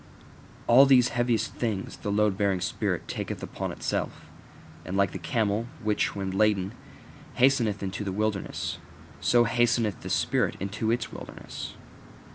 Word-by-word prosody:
All 130 +4 +7
these 125 -2 +6
heaviest 120 -1 0
things 105 -5 -3
the 105 - -3
load 105 -1 +2
bearing 100 -2 +1
spirit 90 - -2
taketh - - -4
upon - - -4
itself: - - -3 0.6
and 95 - -3
like 100 -2 +3
the 95 - -6
camel, 110 +5 0 0.2
which, 105 -1 +1
when 95 -1 -3
laden, 100 0 +2 0.6
hasteneth 120 -6 +3
into 95 +2 -3
the 100 - -3
wilderness, 105 0 -2 0.4
so 120 +8 +4
hasteneth 115 -4 +1
the - - -6
spirit - - +1
into 105 +3 -2
its 115 0 -1
wilderness. - - -8
105 Hz, 140 wpm, -27 LUFS, 100-120 Hz, 0.6 s, All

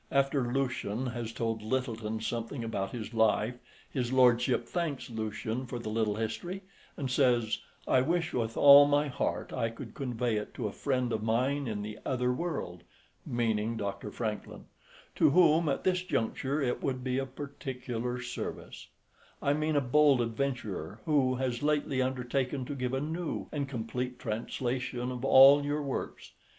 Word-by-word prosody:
After 135 -2 +1
Lucian 130 -3 -1
has 120 -2 -4
told 115 -1 -2
Lyttelton 110 -2 -2
something 115 +3 -3
about 100 -4 -2
his 115 -1 -6
life, 110 +1 +2 0.3
his 125 -3 -2
lordship 125 -2 +4
thanks 155 -7 -3
Lucian 110 +3 -3
for 120 - -4
the 115 -2 -5
little 110 -2 +1
history, 175 - -4 0.3
and 140 - -2
says, 120 -4 +2 0.3
"I 130 - +4
wish 165 +4 0
with 115 -2 -2
all 145 0 +9
my 145 0 +2
heart 125 - -2
I 115 -3 0
could 115 - -9
convey 120 -4 -1
it 105 - -5
to - - -3
a - - -4
friend 125 -2 -1
of 110 - -1
mine 130 +5 0
in 105 -2 -3
the 105 +1 -7
other 125 -1 0
world" 135 - -4 0.5
meaning 115 -1 0
Dr. 100 0 -4
Francklin 110 0 -5 0.5
"to - - +5
whom, 160 0 +5
at 135 - -1
this 180 -1 +2
juncture, 140 -3 -1
it 130 -4 -1
would 130 -2 -2
be 130 0 0
of 135 -1 -5
particular 125 -4 -4
service: 125 0 -6 0.5
I 140 - +2
mean 155 +1 0
a 145 - +4
bold 140 +1 +4
adventurer 115 - -3
who 135 -4 +3
has 125 -2 -2
lately 145 -3 +1
undertaken 130 +1 -1
to 145 - -5
give 125 -1 -2
a 135 - -1
new 160 +2 -3
and 140 -2 -2
complete 125 0 -3
translation 125 +2 -3
of 125 0 -6
all 135 +2 +8
your 145 +1 -1
works. 135 -2 -5
125 Hz, 165 wpm, -30 LUFS, 115-140 Hz, 0.5 s, all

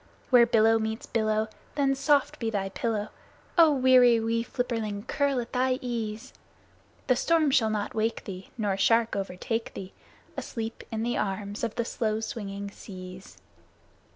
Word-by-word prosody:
Where 240 -2 +7
billow 225 -1 +4
meets 220 +1 -3
billow, 215 -1 0 0.3
then 275 -2 +2
soft 280 0 +2
be 230 - -1
thy 195 -3 -2
pillow, 215 +1 -2 0.5
Ah, 330 -2 +7
weary 255 -4 +5
wee 230 +1 0
flipperling, 225 -5 -3
curl 280 -1 0
at 235 +1 -6
thy 255 0 +2
ease! 225 -3 -4 0.7
The 255 - +3
storm 315 +2 +2
shall 225 -4 +3
not 210 -1 -2
wake 225 +1 -1
thee, 190 -2 -8
nor 205 -4 0
shark 230 +3 +3
overtake 200 +4 -3
thee, 190 0 -7 0.4
Asleep 225 -1 -5
in 220 0 -2
the 240 +1 -1
arms 200 +2 -3
of 230 -2 -2
the 235 - -1
slow 220 -2 -1
swinging 200 -2 -5
seas! 185 -2 -10
225 Hz, 155 wpm, -27 LUFS, 210-245 Hz, 0.7 s, Where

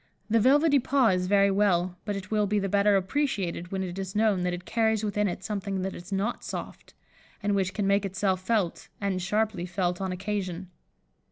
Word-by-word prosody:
The 230 - +5
velvety 285 +5 +5
paw 265 -2 +3
is 180 -1 +1
very 200 0 +4
well, 185 -3 +2
but 205 -2 -2
it 190 0 -7
will 210 -1 +2
be 210 +1 +1
the 195 -1 0
better 200 +1 +3
appreciated 190 -5 -1
when 190 -1 -1
it 180 0 -5
is 190 0 -5
known 210 -3 +2
that 180 0 0
it 180 0 -6
carries 220 0 +1
within 210 0 0
it 185 0 -4
something 195 -1 -3
that 190 - -3
is 175 +3 -10
not 200 +5 -1
soft, - - -7 0.5
and 205 0 +1
which 190 -2 0
can 205 - 0
make 200 +1 +3
itself 190 -1 0
felt, 195 -4 -1
and 195 -2 -1
sharply 210 -1 -1
felt, 180 0 -1
on 190 -1 -2
occasion. 185 -1 -4
195 Hz, 200 wpm, -27 LUFS, 185-210 Hz, 0.5 s, The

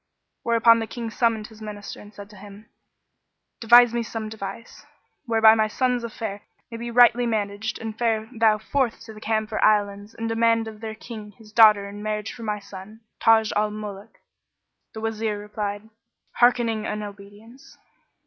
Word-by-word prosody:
where 235 - 0
upon 230 0 +6
the 225 - -4
King 230 -1 -6
summoned 225 -2 0
his 220 -1 -14
Minister 210 -1 -8
and 205 - -14
said 205 -1 -11
to - - -15
him, 205 +2 -13 0.9
"Devise 240 +1 +6
me 240 - 0
some 225 -1 -5
device, 215 +1 -8 0.4
whereby 225 -1 +6
my 220 -1 +2
son's 250 +2 -1
affair 215 -3 -5 0.3
may 230 - -6
be 235 +1 -6
rightly 240 0 +5
managed 215 -1 -2
and 220 -1 -6
fare 220 -1 0
thou 220 -1 +3
forth 245 +2 -1
to 225 -1 -11
the 215 - -13
Camphor 220 -1 -1
Islands 205 0 +1
and 225 0 -4
demand 230 0 +2
of 215 -1 -10
their 220 -1 -6
King 215 -2 -10
his 215 +1 -18
daughter 215 -3 +6
in 205 +1 -9
marriage 210 0 -3
for 240 - -12
my 210 -2 -2
son, 200 +2 -12 0.2
Taj 220 -1 +4
al 210 +1 +1
Muluk." 210 0 -8 0.8
The 220 - -6
Wazir 220 -1 -2
replied, 205 0 -5 0.5
"Hearkening 235 -3 +2
and 210 0 -4
obedience." 205 +5 -13
220 Hz, 170 wpm, -24 LUFS, 210-230 Hz, 0.9 s, upon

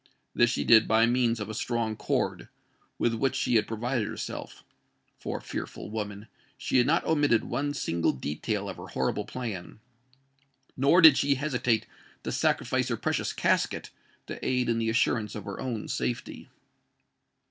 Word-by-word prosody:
This 120 - +4
she 125 - -1
did 110 -1 +6
by 115 +1 +4
means 120 -1 +1
of 105 - -4
a 110 - -6
strong 115 0 -2
cord, - - -2 0.5
with 120 - +1
which 135 +4 0
she 125 -2 +1
had 105 - +1
provided 115 0 -2
herself; - - -6 0.6
for—fearful - - -6
woman!—she 105 +3 -4
had 125 - +3
not 165 +3 +2
omitted 145 -7 +3
one 145 +1 -2
single 85 - 0
detail 95 - -3
of 95 - -6
her - - -9
horrible - - -1
plan—nor 130 - -3
did 160 -5 +9
she 140 0 +2
hesitate 125 -5 0 0.4
to - - -3
sacrifice - - +1
her - - -1
precious - - -1
casket - - 0 0.3
to - - -8
aid 125 -2 +1
in 115 0 +1
the 115 0 0
assurance 115 -1 +1
of 105 - -6
her 100 - -6
own 115 -5 -4
safety. 60 -1 -4
120 Hz, 150 wpm, -28 LUFS, 110-130 Hz, 0.6 s, did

